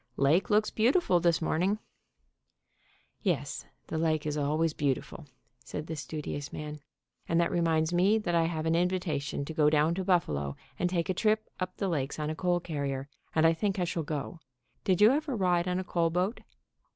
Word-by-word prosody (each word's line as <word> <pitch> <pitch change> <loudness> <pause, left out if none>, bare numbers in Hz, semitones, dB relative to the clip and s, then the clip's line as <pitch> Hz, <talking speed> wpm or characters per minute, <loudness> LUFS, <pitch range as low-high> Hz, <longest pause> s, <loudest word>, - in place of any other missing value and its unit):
Lake 155 +7 +3
looks 215 +1 +3
beau 225 +2 +3
tiful 280 - +3
this 170 -1 +2
morning/' 180 +6 +1 1.4
"Yes, 60 - -2 0.2
the 160 - -3
lake 155 -2 +1
is 150 -1 -1
always 155 +2 +1
beautiful," 145 +1 -2 0.4
said 150 +3 -5
the 160 - -5
studi 150 0 -5
ous 145 -1 -6
man. 150 0 -6 0.5
"And 165 - +3
that 170 - +2
reminds 165 -1 +1
me 190 +5 +4
that 195 -6 -2
I 165 -1 +3
have 160 -1 -2
an 160 - +2
in 175 +2 +3
vitation 155 -6 -2
to 160 - -6
go 150 -1 +4
down 155 +2 +3
to 190 +2 -2
Buffalo 75 - +1 0.2
and 180 - +1
take 175 0 -1
a - - +2
trip 215 +3 +1
up 185 0 -4
the 195 - -1
lakes 145 -6 -2
on 150 0 -2
a - - -4
coal 175 +3 +1
carrier, 140 -5 -3 0.3
and 160 0 +4
I 165 - +6
think 195 +3 -1
I 180 - +1
shall 170 -1 -1
go. 155 +2 -4 0.4
Did 190 -1 +2
you 215 +3 +8
ever 290 -1 0
ride 180 -3 +2
on 180 0 0
a 185 - -1
coal 170 -2 +1
boat?" 180 +7 -1
165 Hz, 200 wpm, -29 LUFS, 150-185 Hz, 1.4 s, you